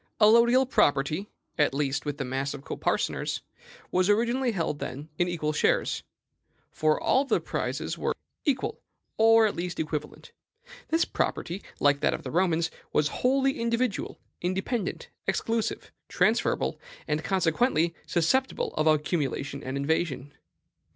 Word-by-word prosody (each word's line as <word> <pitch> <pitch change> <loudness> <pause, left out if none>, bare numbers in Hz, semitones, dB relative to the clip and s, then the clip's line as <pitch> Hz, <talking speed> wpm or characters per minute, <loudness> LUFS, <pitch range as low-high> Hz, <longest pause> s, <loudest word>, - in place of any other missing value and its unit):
Allodial 235 +4 +6
property, 150 - +2 0.3
at 145 -2 +3
least 145 0 -1
with 145 -1 -2
the 135 - -3
mass 135 +3 -2
of 140 - -10
coparceners, - - -1 0.5
was 185 +2 +2
originally 240 +4 +2
held, 165 -7 -2
then, 145 +5 -6
in 175 - +3
equal 155 -3 -1
shares; - - +1 0.7
for 155 0 +1
all 265 - +3
of 275 - -5
the - - +3
prizes - - -3
were - - 0 0.3
equal, 270 -4 -1 0.4
or, 225 0 +7
at 210 - 0
least, 175 0 -4
equivalent. 150 -1 -4 0.6
This 325 +1 +2
property, 180 +4 -2 0.2
like 145 0 +4
that - - +2
of 160 - -9
the 130 - -5
Romans, 170 -2 +1 0.2
was 150 0 +2
wholly 270 +1 +2
individual, 235 -1 -1 0.2
independent, 190 +4 -2 0.2
exclusive, 225 -1 -1 0.2
transferable, - - +1 0.3
and 150 +1 -1
consequently 170 0 +2
susceptible 260 +11 +1
of 155 - +1
accumulation 145 -3 0
and 130 +1 -3
invasion. 145 -1 -1
170 Hz, 135 wpm, -27 LUFS, 150-225 Hz, 0.7 s, or